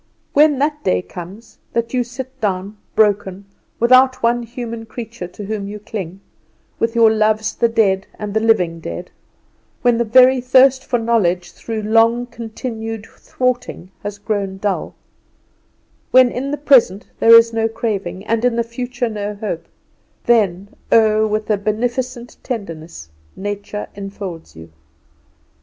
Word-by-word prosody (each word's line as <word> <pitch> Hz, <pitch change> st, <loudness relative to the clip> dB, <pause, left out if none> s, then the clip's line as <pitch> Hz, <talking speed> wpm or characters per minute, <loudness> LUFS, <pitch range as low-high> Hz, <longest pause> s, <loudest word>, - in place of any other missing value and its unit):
When 295 Hz, -1 st, +5 dB
that 295 Hz, +2 st, -1 dB
day 90 Hz, 0 st, +1 dB
comes, 190 Hz, -, -11 dB
that 235 Hz, +1 st, -1 dB
you 250 Hz, -1 st, +2 dB
sit 260 Hz, +2 st, -9 dB
down 195 Hz, 0 st, -2 dB, 0.2 s
broken, 200 Hz, -2 st, +1 dB, 0.3 s
without 255 Hz, +2 st, +4 dB
one 240 Hz, +1 st, +2 dB
human 230 Hz, -1 st, -7 dB
creature 230 Hz, -5 st, -7 dB
to 190 Hz, +3 st, -9 dB
whom 205 Hz, -1 st, -4 dB
you 210 Hz, +1 st, -6 dB
cling, 195 Hz, -3 st, -7 dB, 0.6 s
with 230 Hz, 0 st, 0 dB
your 225 Hz, -1 st, +6 dB
loves 215 Hz, 0 st, +1 dB
the 235 Hz, -, +2 dB
dead 195 Hz, -4 st, +1 dB
and 210 Hz, -1 st, -5 dB
the 220 Hz, -, +2 dB
living 185 Hz, -7 st, +2 dB
dead; 85 Hz, -, -7 dB, 0.7 s
when 240 Hz, -1 st, +3 dB
the -, -, +3 dB
very 255 Hz, +3 st, +5 dB
thirst 260 Hz, +1 st, +4 dB
for 245 Hz, -, 0 dB
knowledge 190 Hz, -7 st, 0 dB
through 220 Hz, -2 st, -5 dB
long 225 Hz, +3 st, +3 dB
continued 225 Hz, -1 st, -6 dB
thwarting 250 Hz, -7 st, -3 dB
has 205 Hz, 0 st, -5 dB
grown 200 Hz, -2 st, -3 dB
dull; 200 Hz, 0 st, -2 dB, 1.1 s
when 255 Hz, -1 st, +6 dB
in 265 Hz, +3 st, -3 dB
the 290 Hz, -, -2 dB
present 250 Hz, -9 st, +4 dB
there 230 Hz, 0 st, +8 dB
is 230 Hz, 0 st, +6 dB
no 225 Hz, 0 st, +1 dB
craving, 205 Hz, -4 st, -4 dB
and 230 Hz, +1 st, 0 dB
in 245 Hz, -1 st, +2 dB
the 235 Hz, -, +1 dB
future 245 Hz, +1 st, -4 dB
no 210 Hz, -1 st, -4 dB
hope, 195 Hz, -6 st, -5 dB, 0.6 s
then, 200 Hz, -5 st, +2 dB, 0.2 s
oh, 220 Hz, -1 st, +4 dB
with 215 Hz, 0 st, -2 dB
a 210 Hz, -, +3 dB
beneficent 240 Hz, +4 st, -3 dB
tenderness, 165 Hz, -, -7 dB, 0.2 s
Nature 205 Hz, +1 st, -5 dB
infolds 195 Hz, -4 st, -8 dB
you. 80 Hz, 0 st, -12 dB
220 Hz, 145 wpm, -19 LUFS, 200-240 Hz, 1.1 s, there